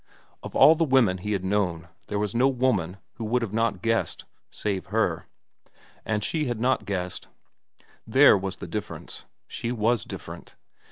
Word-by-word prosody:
Of - - -9
all 145 +4 +8
the 165 +1 +1
women 130 - +3
he 105 +3 -2
had 95 -2 -2
known 90 -4 0 0.2
there 105 - -2
was 105 -1 -1
no 125 +3 +4
woman 125 -9 0 0.2
who 115 - -4
would 115 -2 -1
not 115 -1 +2
have 90 - -16
guessed—save 105 -3 -3
her. 95 -5 0 0.8
And 105 -1 -1
she 155 +6 0
had 120 -4 -2
not 130 +3 +1
guessed. 90 -2 -4 0.8
There 135 +4 +7
was 95 -1 -3
the - - -8
difference. - - -6 0.2
She 120 0 -4
was 115 -1 +1
different. - - -9
110 Hz, 160 wpm, -26 LUFS, 95-125 Hz, 0.8 s, all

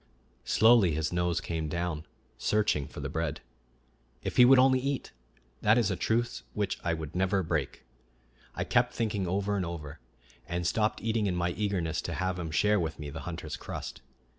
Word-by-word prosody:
Slowly 110 -6 +5
his 80 +1 -1
nose 90 -1 +1
came 80 -3 -3
down, 85 -1 -3 0.3
searching 105 -10 +1
for - - -9
the 70 - -3
bread. 80 +1 -2 0.8
"If - - -4
he 125 - +9
would 135 +2 +8
only 130 0 +5
eat! 140 +1 -2 0.5
that 110 +2 +5
is 110 -4 +2
a - - 0
truce 120 +5 0
which 105 -2 -1
I 85 -2 +1
would 80 -1 -6
never 95 +1 +1
break," 80 - -2 0.7
I - - -1
kept 125 0 +2
thinking 105 -5 -1
over 100 +3 0
and 95 - 0
over, 85 -4 -6 0.5
and 85 0 -2
stopped 105 +5 0
eating 110 -2 +1
in 90 - 0
my 90 0 0
eagerness 90 -5 -1
to 85 - -4
have 95 +2 -1
him 85 -2 -4
share 105 +6 +3
with 80 -3 -2
me 75 -2 -6
the 80 - -6
hunter's 80 -3 -5
crust. - - -7
90 Hz, 185 wpm, -29 LUFS, 80-105 Hz, 0.8 s, he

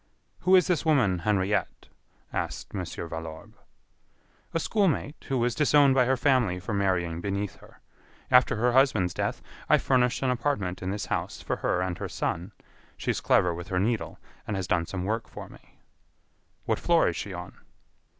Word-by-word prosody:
"Who 185 +1 +4
is 180 - +6
this 180 -4 +1
woman 125 - +3
Henriette?" 100 +2 -1 0.4
asked - - -4
Mon. 95 -3 -3
Valorbe. 80 -1 -7 1.0
"A 165 - 0
school 205 +4 +1
mate, 150 -2 -2
who 135 - 0
was 120 0 +1
disowned 145 +1 +4
by 130 -1 +4
her 130 +1 +2
family 125 -8 +2
for 90 +4 -5
marrying 90 -4 0
beneath 100 +1 -3
her. - - -19 0.5
After 125 -1 +5
her 120 +3 +2
husband's 120 -9 +3
death, - - -3 0.3
I - - +7
furnished 125 0 +1
an 130 - +2
apartment 115 -9 -1
in 95 - -3
this 105 +1 -3
house - - -3
for - - -2
her 90 - 0
and 90 -2 -3
her - - -4
son. 90 +5 -3 0.5
She - - -1
is - - -3
clever 90 -1 +3
with 85 +2 -7
her 90 - -1
needle 110 +3 -1 0.3
and 105 - -2
has 95 -1 -2
done 85 -2 0
some 90 -2 -4
work 110 +3 -2
for - - -9
me." - - -18 0.9
"What - - 0
floor 170 -1 +3
is 85 - -1
she 100 - -5
on?" 90 0 -8
105 Hz, 180 wpm, -27 LUFS, 90-130 Hz, 1.0 s, I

